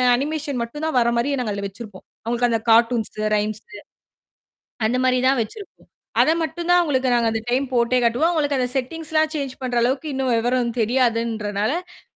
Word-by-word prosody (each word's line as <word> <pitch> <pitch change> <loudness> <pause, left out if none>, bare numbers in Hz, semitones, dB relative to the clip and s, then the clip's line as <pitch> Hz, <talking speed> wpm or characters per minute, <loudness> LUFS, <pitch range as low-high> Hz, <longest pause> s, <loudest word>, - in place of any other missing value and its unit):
Animation 285 -1 -2
மட்டும் 295 +7 -6
தான் 290 - 0
வர்ற 235 0 +2
மாரி 280 +4 0
நாங்க 215 -4 -2
அதுல 200 0 -4
வச்சிருப்போம். 205 -1 -11 0.2
அவங்களுக்கு 240 +1 0
அந்த 225 - 0
கார்ட்டூன்ஸு, 230 -1 +2 0.2
ரைம்ஸு 215 - -4 1.1
அந்த 250 - 0
மாரி 255 0 +3
தான் 270 -2 +2
வச்சிருப்போம். 405 - -13 0.3
அத 315 - +4
மட்டும் 340 +2 -4
தான் 355 0 +6
அவங்களுக்கு 265 -5 0
நாங்க 235 -1 +2
அந்த 225 - -2
டைம் 260 +3 +1
போட்டே 240 +1 +2
காட்டுவோம். 245 +9 +2
அவங்களுக்கு 290 -4 0
அந்த 250 - 0
செட்டிங்ஸ் 310 +5 -4
எல்லாம் 310 0 +2
சேஞ்ச் 275 -3 -3
பண்ற 250 -1 -3
அளவுக்கு 270 +5 -1
இன்னும் 265 -2 0
விவரம் 240 0 0
தெரியாதுன்றனால 230 - -1
250 Hz, 170 wpm, -22 LUFS, 230-290 Hz, 1.1 s, தான்